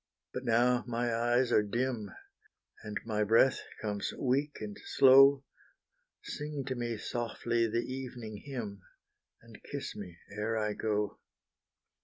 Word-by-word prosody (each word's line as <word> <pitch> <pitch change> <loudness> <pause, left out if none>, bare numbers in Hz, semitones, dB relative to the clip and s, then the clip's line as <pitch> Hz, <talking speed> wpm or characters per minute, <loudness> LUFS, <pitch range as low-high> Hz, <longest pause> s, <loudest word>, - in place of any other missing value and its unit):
But - - -5
now 120 +1 +3
my 120 0 -1
eyes 120 +2 +2
are - - +5
dim, 115 0 -2 0.7
And 105 0 -4
my 105 -2 0
breath 115 +5 +4 0.2
comes 105 -2 -2
weak 140 +3 0
and 105 -2 -6
slow, 135 +1 +7 0.8
Sing 150 -2 -5
to 135 - -2
me 120 -2 -3
softly 115 +1 -1
the 115 +2 -1
evening 125 -4 -6
hymn, 115 -8 -6 0.6
And - - -14
kiss - - -6
me 85 -1 -8 0.2
ere 110 +2 -1
I 105 -1 0
go. 105 -1 -1
120 Hz, 130 wpm, -32 LUFS, 105-130 Hz, 0.8 s, slow